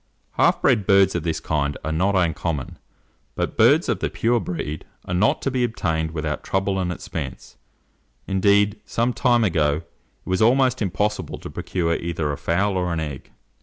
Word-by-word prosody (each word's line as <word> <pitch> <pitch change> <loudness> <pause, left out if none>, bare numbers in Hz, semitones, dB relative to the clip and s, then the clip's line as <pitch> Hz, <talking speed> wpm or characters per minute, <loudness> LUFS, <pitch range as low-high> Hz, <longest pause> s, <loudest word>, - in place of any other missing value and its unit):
Half - - +2
bred 110 -7 +3
birds 100 -2 +5
of 85 - -1
this 80 -1 -2
kind 75 -3 -1
are 80 - -2
not 95 +6 +1
uncommon, 85 -4 -1 0.6
but - - -2
birds - - +5
of - - 0
the - - -1
pure 120 +1 +1
breed 80 -6 -4 0.2
are 90 - -4
not 95 +4 +2
to 135 - 0
be 125 -1 0
obtained 80 -9 -1
without 75 -2 -3
trouble 95 0 0
and 90 -1 -1
expense; 90 - -6 0.7
indeed, 100 +2 +2
some 115 +3 0
time 120 -3 +3
ago, 80 -5 +1
it 85 - -38
was 95 +2 0
almost 130 +2 +3
impossible 100 -2 -1
to - - -9
procure 85 -3 -1
either 85 -3 -2
a 70 - -4
fowl 95 +3 0
or 90 -1 -1
an 85 - -1
egg. 75 -4 -6
90 Hz, 175 wpm, -23 LUFS, 80-105 Hz, 0.7 s, birds